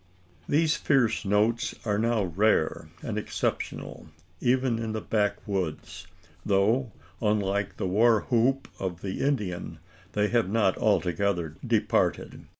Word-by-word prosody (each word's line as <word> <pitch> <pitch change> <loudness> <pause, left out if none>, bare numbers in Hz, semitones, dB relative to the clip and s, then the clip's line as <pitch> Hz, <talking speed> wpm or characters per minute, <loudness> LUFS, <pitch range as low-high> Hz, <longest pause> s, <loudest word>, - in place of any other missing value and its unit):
These 155 +2 +3
fierce 120 -7 +2
notes 105 +4 +1
are 105 -2 +1
now 115 -1 +1
rare 95 -2 +1
and - - -2
exceptional - - -4 0.3
even 125 -2 +1
in 110 -1 -3
the 110 - -2
backwoods 95 -5 -2 0.4
though, 110 +5 +2 0.3
unlike 100 -2 0
the - - -2
war 110 +4 +4
whoop 130 +3 +1
of 90 -3 -4
the 95 -1 -3
Indian, 100 - -2 0.4
they 105 0 +1
have 120 -5 +1
not 105 -3 +2
altogether 90 -5 0
departed. - - 0
105 Hz, 120 wpm, -27 LUFS, 95-115 Hz, 0.4 s, war